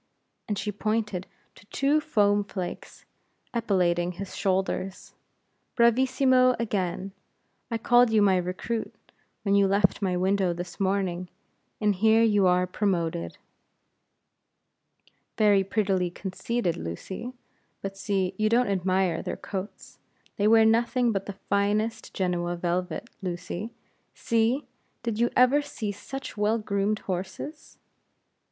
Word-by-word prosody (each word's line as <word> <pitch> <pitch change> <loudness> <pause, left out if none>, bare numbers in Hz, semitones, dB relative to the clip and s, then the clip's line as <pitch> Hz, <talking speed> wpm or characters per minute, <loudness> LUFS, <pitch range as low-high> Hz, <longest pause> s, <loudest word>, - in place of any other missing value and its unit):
and 210 - -2
she 200 +1 -2
pointed 210 -2 -2 0.3
to - - -18
two 285 +6 +2
foam 205 -8 +2
flakes 185 -3 -7 0.5
epauletting 180 -6 +1
his 195 +1 -7
shoulders. 190 0 -2 0.6
"Bravissimo 255 +1 +4
again! 195 -4 -2 0.6
I 230 - -1
called 240 +1 +4
you 220 -1 +3
my 190 -2 +4
recruit, 185 +6 -3 0.5
when 200 - +1
you 200 -1 +5
left 195 +1 +2
my 185 -2 0
window 190 -1 +1
this 175 +3 -7
morning, 190 -2 -1 0.5
and 210 -1 +2
here 220 +4 +4
you 205 -4 +4
are 180 0 +3
promoted." 170 - -1 2.0
"Very 205 -2 +4
prettily 190 -3 0
conceited, 190 +2 -2
Lucy. 190 - -6 0.5
But 195 0 -4
see, 195 -2 -1
you 215 0 +3
don't 240 0 +3
admire 185 -2 +1
their - - -4
coats; 195 +1 -7 0.4
they 205 - +2
wear 225 0 +6
nothing 235 +2 +3
but 195 -2 -3
the 200 -1 -6
finest 210 +3 0
Genoa 175 -2 -1
velvet, 175 +4 -2
Lucy. 180 +3 -4 0.5
See! 230 +5 +1 0.4
did 230 -2 -2
you 235 - +3
ever 255 +4 +5
see 230 -7 -4
such 270 +7 -7
well 210 +2 +2
groomed 205 -1 0
horses?" 190 - -5
200 Hz, 120 wpm, -27 LUFS, 185-225 Hz, 2.0 s, wear